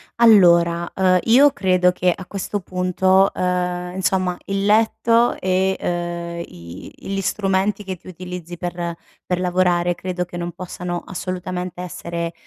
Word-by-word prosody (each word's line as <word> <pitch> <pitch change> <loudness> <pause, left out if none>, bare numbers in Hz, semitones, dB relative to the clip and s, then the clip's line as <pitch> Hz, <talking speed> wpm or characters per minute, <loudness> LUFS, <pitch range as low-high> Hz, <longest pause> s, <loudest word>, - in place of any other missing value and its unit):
allora, 175 -7 +5
ehm, 185 -1 +3
io 270 +5 +6
credo 185 -8 +2
che 180 0 +1
a 185 +1 -6
questo 200 +2 -4
punto, 185 +2 +2
ehm, 180 0 -2
insomma, 185 -1 0
il 195 0 -1
letto 230 +2 +3
e, 190 +1 +1
ehm, 170 -1 -3
i 85 +2 -11
gli 195 0 -4
strumenti 195 +1 0
che 190 -1 -4
tu - - -19
utilizzi 180 -1 -8
per 175 -1 -4 0.3
per 180 -1 -2
lavorare 180 -1 +2
credo 180 0 -4
che 175 - -11
non 175 0 -4
possano 180 -1 -5
assolutamente 180 -1 -5
essere, 170 -1 -5
180 Hz, 140 wpm, -21 LUFS, 175-190 Hz, 0.3 s, io